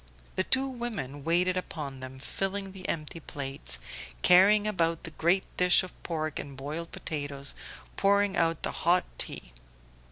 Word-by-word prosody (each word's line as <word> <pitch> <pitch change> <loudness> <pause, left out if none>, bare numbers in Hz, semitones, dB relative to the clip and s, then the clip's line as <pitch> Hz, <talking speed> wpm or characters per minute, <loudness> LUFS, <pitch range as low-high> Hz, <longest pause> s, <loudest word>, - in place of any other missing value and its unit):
The 185 - +2
two 265 +6 +1
women 220 - -4
waited 180 +3 +3
upon 145 -7 -4
them, 130 0 -8
filling 195 +7 -2
the 190 -1 -6
empty 160 0 -2
plates, 140 -2 -3 0.5
carrying 205 +4 +7
about 170 -6 +1
the 165 - -6
great 175 +5 +2
dish 180 +1 +6
of 185 - -8
pork 155 -3 -3
and 140 -2 -7
boiled 155 +5 -5
potatoes, 145 -2 -2 0.4
pouring 200 0 +3
out 165 -2 +1
the - - -1
hot 175 +2 +2
tea. - - -3
170 Hz, 150 wpm, -29 LUFS, 145-190 Hz, 0.5 s, carrying